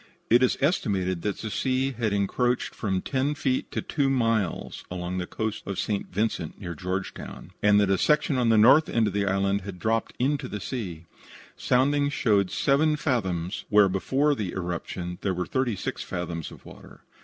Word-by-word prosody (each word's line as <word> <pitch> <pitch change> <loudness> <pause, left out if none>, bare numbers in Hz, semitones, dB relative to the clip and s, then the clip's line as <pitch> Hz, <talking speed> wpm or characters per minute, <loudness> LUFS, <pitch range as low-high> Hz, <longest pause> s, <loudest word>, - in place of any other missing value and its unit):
It 120 +2 +6
is 130 - +3
estimated 95 - 0
that 105 +1 -2
the 110 - -5
sea 130 +3 0
had 115 -4 -1
encroached 120 +5 0
from 95 -4 -2
ten 140 +2 0
feet 130 -3 -1
to - - -3
two 140 -3 0
miles 115 -8 0
along 90 0 -3
the 90 - -4
coast 110 -1 -3
of 100 -2 -3
St. 105 -2 -2
Vincent 95 -5 -2
near 90 -4 -5
Georgetown, 95 +4 -5
and 105 0 +5
that 100 -1 +3
a 95 - +2
section 150 -1 +2
on 120 -2 +2
the 110 - +5
north 135 +9 +6
of 110 -4 +1
the 100 -1 0
island 100 +1 +1
had 95 -1 -7
dropped 110 +4 -1
into 135 +1 0
the 105 - -5
sea. 90 -12 -5 0.5
Soundings 145 +3 +2
showed 100 -8 +2
seven 150 +7 +2
fathoms 95 - -2
where 105 -2 +6
before 135 +10 +1
the 105 -9 -3
eruption 90 0 -4
there 95 -2 -1
were 90 0 -2
thirty 130 -1 0
six - - -4
fathoms 85 -3 -4
of - - -14
water. - - -14
105 Hz, 180 wpm, -26 LUFS, 95-130 Hz, 0.5 s, It